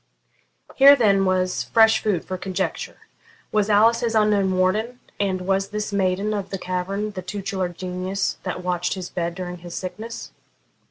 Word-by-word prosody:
Here 280 +1 +9
then 200 -6 +3
was 185 -1 +1
fresh 225 -1 +4
food 200 -6 -1
for 185 - -4
conjecture. 185 0 -3 0.5
Was 210 -1 +1
Alice 220 +3 +5
his 230 -1 -1
unknown 205 -3 +2
warden, 215 +7 0 0.2
and 190 -2 0
was 195 +1 0
this 210 0 -4
maiden 195 +2 0
of 200 -2 -3
the 195 - -3
cavern 190 +3 -3
the 190 -2 -6
tutelar 190 0 -3
genius 185 +2 -3
that 180 -1 -5
watched 180 0 -1
his 185 -2 -7
bed 170 -1 -3
during 180 -1 -5
his 175 0 -9
sickness? 220 +5 -6
195 Hz, 160 wpm, -23 LUFS, 185-210 Hz, 0.5 s, Here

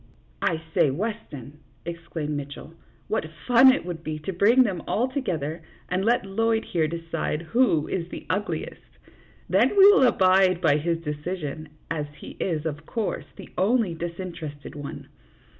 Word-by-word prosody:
" - - -33
I 160 -1 -4
say, - - +4
Weston," 150 - -5 0.3
exclaimed 165 -3 -4
Mitchell, 145 +2 -7 0.2
" - - -34
what 200 -7 -1 0.2
fun 250 +2 +8
it 260 - -1
would 170 -2 -6
be 155 -1 -3
to 155 +5 -5
bring 225 +8 +5
them 195 -7 -2
all 245 +4 +1
together, 170 - -3 0.3
and 185 +1 0
let 235 0 +2
Lloyd, 225 +3 0
here, 160 -3 0
decide 165 -1 -3
who 170 - +2
is 175 -2 -3
the - - -8
ugliest; 205 +3 -4 0.5
then - - +4
we 390 - +9
will 265 -10 +6
abide 185 -3 +4
by 155 -5 +3
his 165 +2 0
decision, 155 0 -5 0.2
as 150 -3 -2
he - - -9
is, 160 -4 -1
of 150 -1 -4
course, 225 -3 -2
the - - -11
only 210 -1 +2
disinterested 165 -4 -6
one. 145 -1 -7
170 Hz, 160 wpm, -25 LUFS, 155-205 Hz, 0.5 s, we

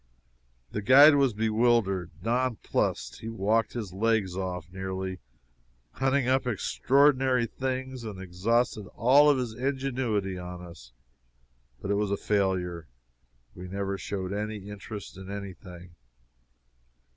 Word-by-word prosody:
The 105 - -3
guide 140 +8 +8
was 140 -4 +3
bewildered 110 -4 +2
non 125 +2 +1
plussed. - - -2
He 110 - -6
walked 115 +1 0
his 105 -7 -5
legs 105 -2 +1
off, 90 -3 -3
nearly, 95 0 -4 0.7
hunting 135 - +1
up 130 0 +2
extraordinary 130 +2 +3
things, 130 +1 -4
and 105 -4 -7
exhausted 105 +4 0
all 140 +7 +6
his 125 -3 -3
ingenuity 125 -7 -2
on 90 0 -7
us, 85 -9 -12 0.9
but 100 - -2
it - - +2
was 105 -1 0
a 100 - 0
failure; 90 -6 -1 0.7
we 90 0 -9
never 100 +1 -3
showed 95 -1 -4
any 105 -1 -4
interest 105 -1 -8
in 95 0 -9
any 100 -1 -5
thing. 90 -1 -13
105 Hz, 125 wpm, -28 LUFS, 95-125 Hz, 0.9 s, guide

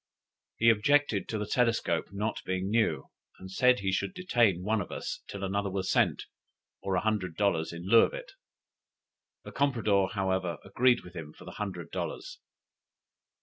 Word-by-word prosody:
He 115 0 +6
objected 115 -1 +2
to 110 - -2
the 105 - -2
telescope 115 -7 +1
not 105 +3 -3
being 95 +1 -2
new; 115 0 0 0.3
and 95 0 -10
said 125 +2 +3
he 95 -1 0
should 140 - -2
detain 120 - +2
one 110 +1 +1
of 90 - -7
us - - -5
till 100 -1 -7
another 100 +1 -1
was 95 0 -2
sent, - - +2 0.6
or 95 -1 -1
a 90 - +1
hundred 100 -6 -1
dollars 90 -6 +1
in 85 +2 -8
lieu 115 +3 +7
of - - +1
it. - - -8 1.1
The - - -9
compradore, 110 -9 +1
however, 95 -4 -1
agreed 120 +5 +3
with 90 - -13
him 75 -3 -7
for - - -15
the - - -8
hundred 100 -3 -5
dollars. 380 -6 -5
100 Hz, 170 wpm, -29 LUFS, 95-115 Hz, 1.1 s, lieu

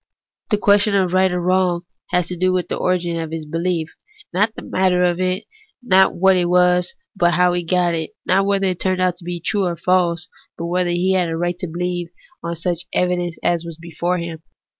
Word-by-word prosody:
The 210 - +2
question 205 0 +3
of 185 -2 +1
right 185 0 +3
or 180 - -1
wrong 180 -1 +1 0.3
has 180 -1 +1
to 180 - -4
do 185 +1 +1
with 185 -1 -1
the - - -1
origin 175 -2 -1
of 160 -1 -4
his 160 -1 -5
behef, 165 +1 -1 0.5
not 210 +5 +1
the - - -8
matter 185 -1 +1
of 175 0 +1
it; 185 +1 0 0.4
not 190 -5 +4
what 190 +2 +4
it 175 -1 +1
was, 180 0 +3 0.2
but 175 -3 +2
how 180 0 +3
he 175 - 0
got 175 0 +1
it; 160 -1 -4
not 195 +2 +2
whether 195 -1 +1
it 185 -2 -1
turned 185 -1 0
out 180 -1 +1
to 175 - -12
be 175 0 -4
true 200 +3 0
or 170 -1 -2
false, 175 -1 +1 0.3
but 170 - -4
whether 180 +1 0
he 175 +2 +1
had 180 -2 +1
a 165 - -2
right 175 +1 -2
to 180 - -4
believe 175 +1 -3 0.3
on 170 0 -4
such 170 +1 -2
evidence 175 -2 0
as 170 -1 +1
was 170 -2 -8
before 170 +2 -2
him. 170 -2 -6
180 Hz, 220 wpm, -20 LUFS, 170-185 Hz, 0.5 s, not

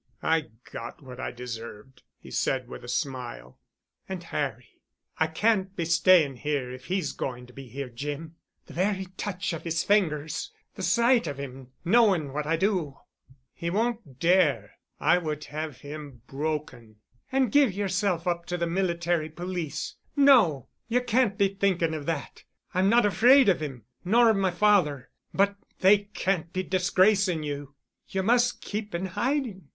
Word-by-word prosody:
"I 160 -1 +2 0.2
got 120 +6 -8
what 125 -1 -10
I - - -3
deserved," 115 0 -8 0.2
he - - -14
said 130 -2 0
with - - -9
a - - -9
smile. 120 - -4 0.5
"And 185 -2 -5
Harry? 135 -8 -4 0.4
I 160 - +3
can't 195 +3 +1
be 170 - -2
staying 170 -4 +4
here 140 -2 -2
if 130 0 -10
he's 185 0 -1
going 125 -2 -5
to 125 - -17
be 135 0 -10
here, 135 +2 -5
Jim. 145 +6 -6 0.3
The - - -13
very 190 +2 0
touch 190 -2 -3
of 165 - -5
his 165 -1 -1
fingers... 160 -7 0 0.2
the - - -8
sight 235 -4 +3
of 140 -2 -4
him, 135 -2 -8 0.2
knowing 185 - +3
what 150 0 -3
I 165 - +2
do——" 170 -6 0 0.6
"He 170 - -4
won't 220 - -2
dare—I 165 - +2
would 155 -3 -4
have 155 -2 -5
him 145 -5 -9
broken——" 140 -6 -4 0.4
"And 260 -4 +2
give 285 -4 +5
yourself 190 -2 -1
up 170 -1 -1
to 180 - -2
the 170 - 0
Military 170 -2 0
Police. 160 -3 -5 0.2
No. 235 - +5 0.2
You 245 +2 +1
can't 240 -4 +2
be 200 - +4
thinking 190 -4 0
of 150 -2 -5
that. 160 -4 -4 0.3
I'm 185 +2 +3
not 235 0 +5
afraid 240 +6 +6
of 185 - +3
him—nor 150 - +1
of - - +1
my 195 -1 +2
father. 175 -8 +2 0.2
But—they 200 0 +2
can't 180 -3 -1
be 185 - -2
disgracing 185 -1 +2
you. 145 -1 -5 0.3
You 190 0 -1
must 240 +3 +2
keep 210 -2 -5
in 175 +2 -2
hiding. 215 - -2
170 Hz, 155 wpm, -27 LUFS, 145-195 Hz, 0.6 s, afraid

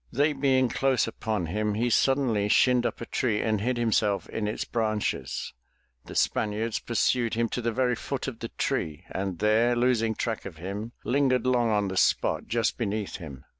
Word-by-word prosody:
They 145 +3 +2
being 135 -2 +2
close 130 0 +1
upon 110 -4 -3
him, 105 +5 -1
he 120 +3 0
suddenly 120 -6 +2
shinned 120 +3 +4
up - - -6
a - - -4
tree 115 -4 0
and 110 -2 0
hid 125 +3 0
himself 105 -3 +1
in 105 -2 -2
its 105 - -3
branches. 110 -2 -2 0.5
The - - -9
Spaniards 110 +1 0
pursued 120 0 +1
him 115 0 +1
to 125 - -3
the 115 0 0
very 125 +1 +1
foot 135 +3 -4
of 120 -4 -6
the 115 - -5
tree 75 -2 -2
and 95 -2 -3
there 110 +5 +3
losing 120 -2 +2
track 115 0 -2
of 90 -5 -8
him 100 +7 -5
lingered 130 -2 +2
long 125 -2 +2
on 105 -2 +1
the 95 0 -4
spot - - +2
just 115 +1 0
beneath 105 -2 -2
him. 70 -6 -10
115 Hz, 185 wpm, -27 LUFS, 105-125 Hz, 0.5 s, shinned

